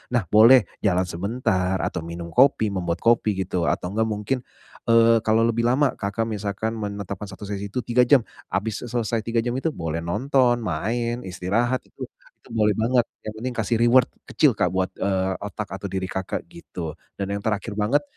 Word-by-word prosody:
Nah, 120 - +2
boleh 115 +3 +8 0.2
jalan 90 -3 +2
sebentar, 95 +1 -1
atau 85 - -2
minum 85 +1 -7
kopi, 120 -5 +4
membuat 90 -3 -3
kopi, 115 -3 +3
gitu. 90 -2 -1
Atau 90 - -1
nggak, 110 +2 +1
mungkin, 105 +5 -1 0.5
eee, 115 0 +5
kalau 110 +1 +3
lebih 115 +1 +1
lama, 135 +3 +3
Kakak 100 +3 -1
misalkan 105 0 -3
menetapkan 100 -1 -5
satu - - -10
sesi 100 0 -4
itu 125 +5 -4
3 125 +1 +3
jam 135 -4 +5 0.2
habis 105 +2 -2
e 120 - -7
selesai 115 -1 -1
3 115 0 +1
jam 120 - -1
itu 160 - 0
boleh 80 0 -3
nonton, 120 +7 +2
main, 115 +7 -1
istirahat, 105 +8 0
itu - - -9 0.4
itu - - -12
boleh 105 -2 +2
banget. 120 +3 +3 0.2
Yang 110 - -4
penting 125 +1 -3
kasih 115 +1 +1
reward 125 +2 +5 0.2
kecil, - - +4
Kak, 90 - +1
buat, 95 +1 -1
eee, 95 -1 +1
otak 105 +1 -5
atau 100 +1 -5
diri 95 0 -2
Kakak, 95 0 -3
gitu. 170 - -7 0.3
Dan 100 0 -3
yang 100 - -3
terakhir 105 0 -2
banget, 110 +8 +1
105 Hz, 185 wpm, -24 LUFS, 95-120 Hz, 0.5 s, boleh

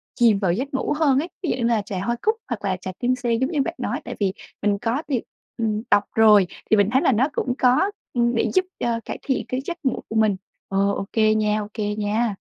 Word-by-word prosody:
chìm 230 -5 +4
vào 190 -4 +1
giấc 265 +8 -3
ngủ 265 - 0
hơn 275 -4 +4
ấy, 330 +5 -3
ví 340 - -1
dụ - - +1
như 245 - -2
là 230 -2 +2
trà 200 -2 -5
hoa 235 +5 -1
cúc 435 +1 +2
hoặc 215 -4 -4
là 190 -2 0
trà 185 - -4
tim 250 +1 +1
sen 240 -3 -1
giống 260 +5 0
như 295 -4 +1
bạn - - -2
nói, - - -3
tại - - -5
vì 195 -2 +1 0.3
mình 205 0 +2
có 235 +6 -1
tìm 265 -6 -1 0.3
ừm, 215 -2 -1
đọc 205 0 +5
rồi 210 -4 +6 0.2
thì 215 - +5
mình 205 0 +3
thấy 265 - +3
là 265 - +4
nó 250 +4 +3
cũng 250 - -1
có, 260 +11 +3 0.2
ưm, 240 -1 +2
để - - +1
giúp 370 0 +3
cho 235 -1 0
cải - - -5
thiện 265 - -1
cái 255 +1 -2
giấc 350 - -4
ngủ 260 - 0
của 220 - -5
mình. 215 -3 +3 0.3
Ờ, 195 - -2 0.2
ô 195 - -3
kê 215 -1 +4
nha, 215 0 +1
ô 205 - -6
kê 210 -2 -2
nha. 215 +1 0
230 Hz, 265 wpm, -23 LUFS, 210-260 Hz, 0.3 s, rồi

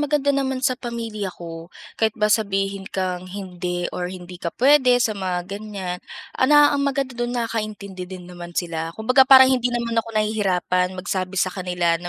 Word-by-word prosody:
maganda 290 -1 +1
naman 265 -1 -1
sa 255 - +4
pamilya 230 -5 -5
ko, 165 -1 -8 0.3
kahit 220 -1 +1
ba 210 -1 +2
sabihin 195 -2 -1
kang 185 -1 -3
hindi 180 -2 -4
or 180 0 -3
hindi 180 -1 -9
ka 170 - -2
puwede 260 -1 +5
sa 220 - +1
mga 185 -3 -3
ganiyan, 195 -2 -6 0.3
ala, 295 +2 +5
ang 285 - 0
maganda 275 -1 -1
dun, 240 0 -3
nakaintindi 210 -5 -4
din 185 -1 -9
naman 175 -1 -10
sila. 165 -2 -2
Kumbaga, 255 +4 +4
parang 265 -1 +9
hindi 250 -1 +1
naman 235 -1 -2
ako 230 - -12
nahihirapan 185 -4 0
magsabi 185 0 -3
sa 185 0 +1
kanila, 180 -3 0
na 175 - -5
200 Hz, 175 wpm, -22 LUFS, 180-240 Hz, 0.3 s, parang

